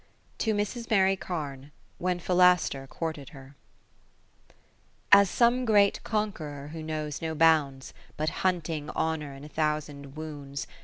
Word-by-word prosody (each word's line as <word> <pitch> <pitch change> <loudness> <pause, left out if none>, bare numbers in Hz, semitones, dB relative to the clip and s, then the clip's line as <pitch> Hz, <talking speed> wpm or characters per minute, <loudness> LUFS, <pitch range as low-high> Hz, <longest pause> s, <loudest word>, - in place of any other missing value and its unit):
To 220 -2 +1
Mrs. 220 +3 -3
Mary 195 -3 +4
Carne, 145 -7 -6 0.3
when 180 0 -1
Philaster 180 -6 +3
courted 155 -3 -5
her 135 +1 -14 1.6
As 200 -1 +8
some 240 +4 +3
great 205 -4 +3
Conqueror 155 -10 -3
who 160 +1 -7
knows 155 -2 -4
no 160 -1 -3
bounds. 150 -4 +2 0.2
But 155 +1 0
hunting 165 -5 -1
Honour 155 -3 -2
in 135 - -11
a - - -8
thousand 150 -2 -3
wounds. 145 -3 -6
160 Hz, 125 wpm, -28 LUFS, 145-185 Hz, 1.6 s, As